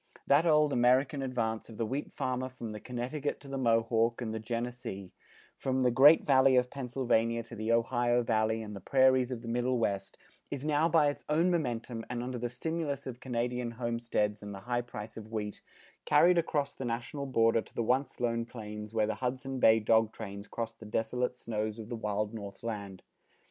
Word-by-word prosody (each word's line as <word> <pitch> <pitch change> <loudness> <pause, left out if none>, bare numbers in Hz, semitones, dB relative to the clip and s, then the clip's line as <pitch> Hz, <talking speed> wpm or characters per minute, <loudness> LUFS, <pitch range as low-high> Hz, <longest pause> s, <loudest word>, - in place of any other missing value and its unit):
That 145 +5 +4
old 150 -2 +4
American 130 +4 +3
advance 115 -4 -2
of 110 - -10
the 115 - 0
wheat 135 +7 -3
farmer 130 0 -2
from 120 -3 -7
the 105 - -6
Connecticut 130 +5 -3
to 140 - -13
the 135 0 -4
Mohawk, 115 -1 +2
and 115 -3 -3
the 110 - -3
Genesee, 115 -4 -5 0.4
from 130 0 -1
the 125 -1 +3
Great 140 +6 +7
Valley 130 -2 +5
of 125 0 +2
Pennsylvania 120 -3 0
to 115 - -10
the 110 +1 -2
Ohio 120 +1 +2
Valley 110 -1 +1
and 105 -1 -7
the 100 - -8
prairies 130 +1 +4
of 125 -2 -5
the - - -8
Middle 125 +2 0
West, 100 -4 -2 0.3
is 140 0 -4
now 155 +2 +2
by 155 -3 +4
its 145 - -6
own 165 +4 +3
momentum 120 -7 -2
and 120 0 -3
under 125 0 -4
the 120 +1 -2
stimulus 145 +2 -3
of 125 -2 -6
Canadian 125 -1 -2
homesteads 115 -3 -1
and 105 -1 -7
the 95 - -9
high 120 +1 -1
price 110 -2 -8
of 110 0 -9
wheat, 105 -2 -4 0.4
carried 170 +4 +5
across 145 -4 -1
the - - -7
national 120 +4 -3
border 115 -3 +3
to - - -17
the 115 - 0
once 130 +3 0
lone 115 -1 0
plains 105 -2 -8
where 110 -1 +3
the - - -1
Hudson 130 +1 -2
Bay 110 -2 +6
dog 110 0 +3
trains 100 -2 -8
crossed 115 -1 -5
the 110 - -10
desolate 125 +4 -1
snows 110 -2 -3
of 110 -1 -8
the 120 - -3
wild 105 -1 -2
North 100 -2 -8
Land. 100 -5 -5
120 Hz, 200 wpm, -31 LUFS, 110-130 Hz, 0.4 s, Great